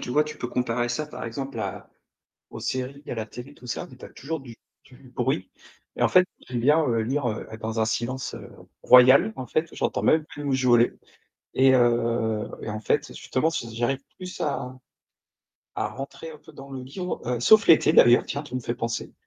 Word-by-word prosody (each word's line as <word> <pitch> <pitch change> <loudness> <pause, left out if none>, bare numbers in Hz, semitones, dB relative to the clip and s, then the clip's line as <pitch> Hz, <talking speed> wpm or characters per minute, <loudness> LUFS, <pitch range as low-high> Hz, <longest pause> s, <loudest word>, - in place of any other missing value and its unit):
tu - - -7
vois? 150 +4 +3
Tu 150 0 -8
peux 120 - -4
comparer 120 -1 -1
ça 120 +5 -2
par 150 - -9
exemple 135 +1 -5
à 100 -2 -6 0.6
aux - - -8
séries, 130 +2 -4
à - - -2
la 110 -1 -3
télé 125 +6 -10
tout 125 - -15
ça, 120 - -4
mais 130 - -14
tu - - -12
as - - -9
toujours 160 +4 -5
du 130 -5 -11 0.3
du 130 0 -17
bruit. 120 -7 -2 0.5
Et - - -1
en - - +5
fait, 185 0 +6 0.2
j'aime 120 -1 -2
bien, 150 +6 +4
heu, 115 -2 +1
lire 130 +3 -1
heu, 110 - -5
être 110 0 -9
dans 110 0 -2
un - - +3
silence, 120 +4 -3
heu, - - -9 0.4
royal 125 -2 +7
en 130 -1 -6
fait, 155 +6 -1
ou - - -11
j'entends - - -1
même 155 -1 +4
plus 145 0 -9
mouche 130 -2 0
voler. 120 -1 +5 0.6
Et, 130 0 +5
heu 115 -3 +1
et 110 - -4
en 110 - -4
fait, - - 0
justement, 140 +5 -1
s 165 -8 -3
j'arrive 120 +4 -1 0.2
plus 180 -1 -8
à 130 -5 -3 1.0
à - - -1
rentrer 135 +4 -8
un 155 - -11
peu 160 +1 -17
dans 135 0 -11
le 130 -1 -6
livre, 180 +8 -5
heu, 120 0 -1
sauf 210 - +6
l'été 160 -1 +6
d'ailleurs, 120 -6 +7
tiens, 145 - -4
tu 145 - -8
me 130 - 0
fais 120 - -3
penser. 115 -1 -4
130 Hz, 220 wpm, -25 LUFS, 120-145 Hz, 1.0 s, royal